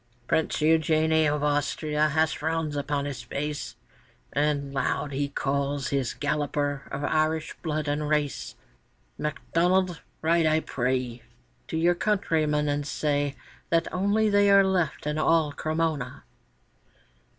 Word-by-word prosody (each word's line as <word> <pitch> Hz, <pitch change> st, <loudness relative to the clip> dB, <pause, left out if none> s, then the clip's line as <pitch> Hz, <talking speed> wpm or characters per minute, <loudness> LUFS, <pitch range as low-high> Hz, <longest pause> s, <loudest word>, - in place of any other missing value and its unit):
Prince 160 Hz, -, +1 dB
Eugène 160 Hz, 0 st, +3 dB
of 150 Hz, 0 st, -1 dB
Austria 150 Hz, +1 st, +1 dB
has 155 Hz, 0 st, +2 dB
frowns 160 Hz, -1 st, -2 dB
upon 145 Hz, 0 st, -1 dB
his 140 Hz, -4 st, -5 dB
face, 145 Hz, +4 st, -4 dB, 0.6 s
And 140 Hz, -1 st, 0 dB
loud 140 Hz, +1 st, -1 dB
he 140 Hz, +1 st, -1 dB
calls 140 Hz, 0 st, -1 dB
his 135 Hz, -3 st, -1 dB
Galloper 145 Hz, -1 st, -1 dB
of 145 Hz, -, -4 dB
Irish 155 Hz, +1 st, 0 dB
blood 155 Hz, -2 st, -2 dB
and 145 Hz, +1 st, -1 dB
race: 145 Hz, -, -1 dB, 0.6 s
'MacDonnell, 175 Hz, +3 st, +1 dB, 0.2 s
ride, 165 Hz, 0 st, +3 dB
I 155 Hz, 0 st, +3 dB
pray, 125 Hz, -3 st, -2 dB, 0.5 s
To -, -, -3 dB
your 170 Hz, +2 st, +4 dB
countrymen, 160 Hz, -7 st, +1 dB
and 145 Hz, 0 st, -1 dB
say 145 Hz, -1 st, 0 dB, 0.3 s
That 165 Hz, 0 st, +1 dB
only 200 Hz, +4 st, +2 dB
they 205 Hz, -1 st, +4 dB
are 200 Hz, 0 st, +7 dB
left 185 Hz, -6 st, 0 dB
in 150 Hz, +1 st, -1 dB
all 155 Hz, -1 st, +3 dB
Cremona! 155 Hz, -3 st, -2 dB
150 Hz, 130 wpm, -26 LUFS, 145-160 Hz, 0.6 s, are